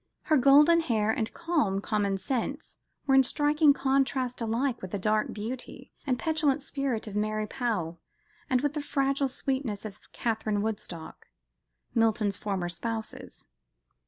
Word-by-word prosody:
Her 310 Hz, -, +3 dB
golden 290 Hz, +6 st, +6 dB
hair 220 Hz, -9 st, +1 dB
and 220 Hz, 0 st, -2 dB
calm 315 Hz, -, 0 dB
commonsense 210 Hz, +7 st, -2 dB, 0.3 s
were 270 Hz, -, +2 dB
in 270 Hz, -, +8 dB
striking 295 Hz, +3 st, +3 dB
contrast, 265 Hz, -2 st, 0 dB
alike 230 Hz, +3 st, -1 dB
with 185 Hz, -, -6 dB
the 205 Hz, -, -3 dB
dark 215 Hz, +2 st, +1 dB
beauty 230 Hz, +4 st, -7 dB, 0.2 s
and 255 Hz, -2 st, +1 dB
petulant 300 Hz, -2 st, +1 dB
spirit 275 Hz, -6 st, -2 dB
of 210 Hz, -2 st, -7 dB
Mary 215 Hz, +1 st, 0 dB
Powell, 200 Hz, -8 st, -2 dB, 0.5 s
and 255 Hz, -2 st, +2 dB
with 290 Hz, 0 st, 0 dB
the 300 Hz, -, -2 dB
fragile 275 Hz, -1 st, 0 dB
sweetness 260 Hz, -5 st, -2 dB
of 210 Hz, -1 st, -8 dB
Catherine 215 Hz, -3 st, -1 dB
Woodcock, 180 Hz, -7 st, -5 dB, 0.7 s
Milton's 220 Hz, -3 st, +2 dB
former 195 Hz, -4 st, -2 dB
spouses. 220 Hz, +6 st, -5 dB
235 Hz, 135 wpm, -28 LUFS, 210-275 Hz, 0.7 s, in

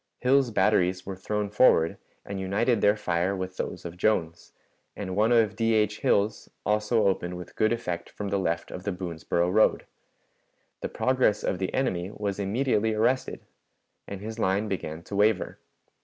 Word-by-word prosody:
Hill's 130 Hz, 0 st, +3 dB
batteries 95 Hz, -3 st, +2 dB
were 95 Hz, -, -5 dB
thrown 105 Hz, +2 st, -3 dB
forward 95 Hz, -7 st, +4 dB, 0.3 s
and 100 Hz, -1 st, -5 dB
united 105 Hz, +4 st, +1 dB
their 105 Hz, +1 st, +4 dB
fire 90 Hz, 0 st, 0 dB
with 95 Hz, 0 st, -5 dB
those -, -, -4 dB
of 85 Hz, 0 st, -7 dB
Jones, 85 Hz, -4 st, 0 dB, 0.4 s
and 95 Hz, -3 st, -5 dB
one 110 Hz, +3 st, +3 dB
of 115 Hz, -3 st, +3 dB
D. 115 Hz, -1 st, +1 dB
H. 105 Hz, -1 st, +1 dB
Hill's 100 Hz, +2 st, +1 dB, 0.2 s
also 105 Hz, +1 st, +2 dB
opened 90 Hz, -2 st, 0 dB
with 90 Hz, -, -10 dB
good 110 Hz, +1 st, +2 dB
effect 90 Hz, -8 st, -3 dB
from 105 Hz, -1 st, -5 dB
the 100 Hz, 0 st, 0 dB
left 85 Hz, -2 st, -2 dB
of 90 Hz, -, -7 dB
the 100 Hz, -, -1 dB
Boonsboro 85 Hz, -1 st, -2 dB
road. 110 Hz, +1 st, +3 dB, 1.0 s
The -, -, -3 dB
progress 130 Hz, -5 st, +1 dB
of 90 Hz, -, -1 dB
the 95 Hz, -, -2 dB
enemy 95 Hz, -9 st, -1 dB
was 105 Hz, -2 st, -4 dB
immediately 110 Hz, +1 st, +1 dB
arrested, 120 Hz, +4 st, 0 dB, 0.7 s
and 100 Hz, -1 st, -7 dB
his 110 Hz, +2 st, -6 dB
line 100 Hz, +2 st, +1 dB
began 80 Hz, -4 st, -4 dB
to 100 Hz, -, -7 dB
waver. 105 Hz, 0 st, +1 dB
100 Hz, 170 wpm, -27 LUFS, 90-110 Hz, 1.0 s, forward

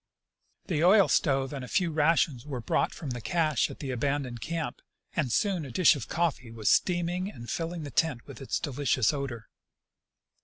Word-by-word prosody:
The 160 Hz, -4 st, 0 dB
oil 195 Hz, +2 st, +6 dB
stove 135 Hz, -3 st, +1 dB
and 135 Hz, -2 st, -5 dB
a -, -, -7 dB
few 175 Hz, +2 st, +1 dB
rations 150 Hz, -4 st, +2 dB
were 140 Hz, -4 st, -5 dB
brought 115 Hz, -, 0 dB
from 150 Hz, -6 st, -6 dB
the 120 Hz, -1 st, -4 dB
cache 155 Hz, 0 st, +1 dB
at -, -, -9 dB
the 135 Hz, -3 st, -5 dB
abandoned 130 Hz, -1 st, -2 dB
camp, 165 Hz, +2 st, -4 dB, 0.3 s
and 145 Hz, -7 st, 0 dB
soon 190 Hz, -, +1 dB
a 140 Hz, -, -7 dB
dish 165 Hz, +6 st, +5 dB
of 140 Hz, -, -6 dB
coffee 160 Hz, -8 st, -1 dB
was 110 Hz, -3 st, 0 dB
steaming 180 Hz, +1 st, +1 dB
and 120 Hz, -, -10 dB
filling 165 Hz, +2 st, -3 dB
the 145 Hz, -, -7 dB
tent 130 Hz, -3 st, 0 dB
with -, -, -11 dB
its 135 Hz, -, -2 dB
delicious 140 Hz, -3 st, +1 dB
odor. 135 Hz, -6 st, -5 dB
145 Hz, 185 wpm, -28 LUFS, 125-170 Hz, 0.3 s, oil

